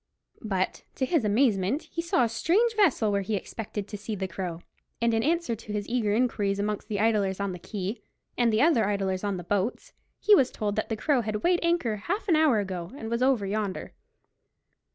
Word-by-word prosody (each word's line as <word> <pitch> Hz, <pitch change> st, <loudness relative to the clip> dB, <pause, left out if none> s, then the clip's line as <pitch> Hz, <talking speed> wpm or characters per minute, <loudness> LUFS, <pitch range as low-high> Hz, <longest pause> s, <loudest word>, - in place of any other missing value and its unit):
But, 190 Hz, -4 st, -1 dB
to 260 Hz, -, 0 dB
his 310 Hz, -1 st, +1 dB
amazement, 215 Hz, -, +2 dB
he 335 Hz, -, -4 dB
saw 335 Hz, -7 st, +2 dB
a -, -, +3 dB
strange 410 Hz, -, +2 dB
vessel 310 Hz, -, +3 dB
where 200 Hz, 0 st, +1 dB
he 210 Hz, +2 st, -2 dB
expected 205 Hz, +1 st, -5 dB
to 205 Hz, -, -6 dB
see 210 Hz, +1 st, -4 dB
the 190 Hz, -1 st, -3 dB
Crow, 175 Hz, -2 st, -5 dB, 0.4 s
and 235 Hz, 0 st, +2 dB
in 225 Hz, -, +2 dB
answer 325 Hz, -3 st, 0 dB
to 215 Hz, -1 st, -10 dB
his 205 Hz, -1 st, -3 dB
eager 230 Hz, -4 st, 0 dB
inquiries 210 Hz, -5 st, +1 dB
amongst 205 Hz, +1 st, -2 dB
the 210 Hz, -3 st, -2 dB
idlers 205 Hz, -3 st, +1 dB
on 200 Hz, -1 st, -1 dB
the 180 Hz, -, -7 dB
quay, 200 Hz, +4 st, -5 dB, 0.3 s
and 240 Hz, -2 st, +3 dB
the 215 Hz, +4 st, +3 dB
other 285 Hz, -11 st, +4 dB
idlers 195 Hz, -2 st, -1 dB
on 200 Hz, -2 st, -1 dB
the 175 Hz, -, -6 dB
boats, 205 Hz, +6 st, -2 dB, 0.3 s
he 425 Hz, -, +5 dB
was 265 Hz, -10 st, +6 dB
told 205 Hz, -1 st, -3 dB
that 215 Hz, -, -2 dB
the 225 Hz, -, -2 dB
Crow 275 Hz, +2 st, +2 dB
had 215 Hz, -1 st, -3 dB
weighed 350 Hz, 0 st, +3 dB
anchor 335 Hz, -11 st, +1 dB
half 395 Hz, -, -3 dB
an 340 Hz, -, +4 dB
hour 310 Hz, -7 st, +4 dB
ago, 185 Hz, -4 st, -3 dB
and 225 Hz, -4 st, -6 dB
was 235 Hz, +1 st, 0 dB
over 255 Hz, -6 st, +3 dB
yonder. 200 Hz, -1 st, -3 dB
215 Hz, 215 wpm, -27 LUFS, 200-255 Hz, 0.4 s, was